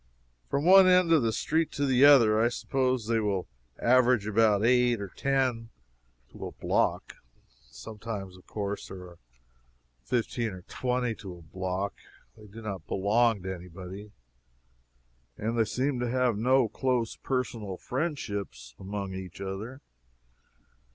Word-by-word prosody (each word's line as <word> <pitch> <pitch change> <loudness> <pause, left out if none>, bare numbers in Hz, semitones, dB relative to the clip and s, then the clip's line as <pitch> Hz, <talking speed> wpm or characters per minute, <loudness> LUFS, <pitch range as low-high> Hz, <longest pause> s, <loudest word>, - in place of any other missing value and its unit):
From 140 +2 -1
one 190 +1 +8
end 180 -2 +5
of 160 -3 +5
the 115 -1 +1
street 160 +8 0
to 145 - 0
the 130 0 +5
other, 115 -7 +6
I - - +4
suppose 130 -1 -1
they 115 0 +1
will 100 -4 -1 0.3
average 125 -3 +4
about 105 0 +3
eight 125 -1 +3
or 100 -1 -5
ten 130 -2 -1 0.6
to - - -7
a - - -8
block. - - -1 0.5
Sometimes, 100 - -7
of 90 - -18
course, 100 -1 -4
there 95 -1 -9
are 85 -1 -17 0.8
fifteen 115 - -1
or 90 -1 -10
twenty 125 +1 -2
to 95 -4 -9
a - - -14
block. 95 +3 -4 0.4
They 105 - -15
do 110 +3 -11
not 95 -6 -6
belong 105 +1 +2
to 95 0 -3
any 90 0 -10
body, 95 +4 -9 1.3
and 115 +2 -2
they 115 -1 +3
seem 130 +3 -1
to 120 -1 -1
have 125 -2 +1
no 125 +3 +3
close 125 -1 -1
personal 115 -7 -3
friendships 100 - -4
among 100 0 -5
each 95 -2 -8
other. 100 +8 -6
110 Hz, 145 wpm, -28 LUFS, 95-125 Hz, 1.3 s, one